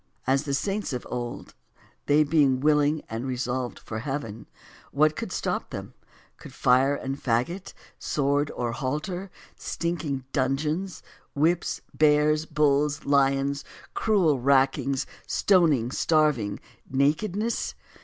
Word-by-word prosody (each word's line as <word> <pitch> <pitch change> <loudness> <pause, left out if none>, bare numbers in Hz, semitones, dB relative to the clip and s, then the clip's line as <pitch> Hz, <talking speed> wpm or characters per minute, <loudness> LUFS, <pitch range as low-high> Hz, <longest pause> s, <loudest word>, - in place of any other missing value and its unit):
As, 135 +1 +3
1. 150 - -6
The 140 - -2
saints 195 +1 -2
of 125 - -4
old, 120 -1 -5 0.5
they 150 +1 +5
being 145 -4 +3
willing 150 +1 +2
and 115 +4 -4
re 130 -1 -2
solved 125 0 -2
for 110 - -6
heaven, 115 -4 -5 0.4
what 155 +2 +3
could - - -5
stop - - -2
them? - - -7 0.4
Could - - -12
fire 130 +3 +3
and 135 0 -5
fagot, 135 +11 -1 0.3
sword 145 0 0
or 120 -1 -2
halter, 150 +9 -3 0.3
stinking 160 -6 -3
dun 135 -1 +1
geons, 160 +5 -3 0.3
whips, 165 +4 +1
bears, 150 +1 +3
bulls, 150 -1 +1
lions, 140 0 +2 0.3
cruel 180 - +2
rackings, 135 0 +2 0.2
stoning, 155 - +3
starving, 150 -10 +1 0.3
nakedness? 180 - 0
145 Hz, 125 wpm, -26 LUFS, 130-155 Hz, 0.5 s, they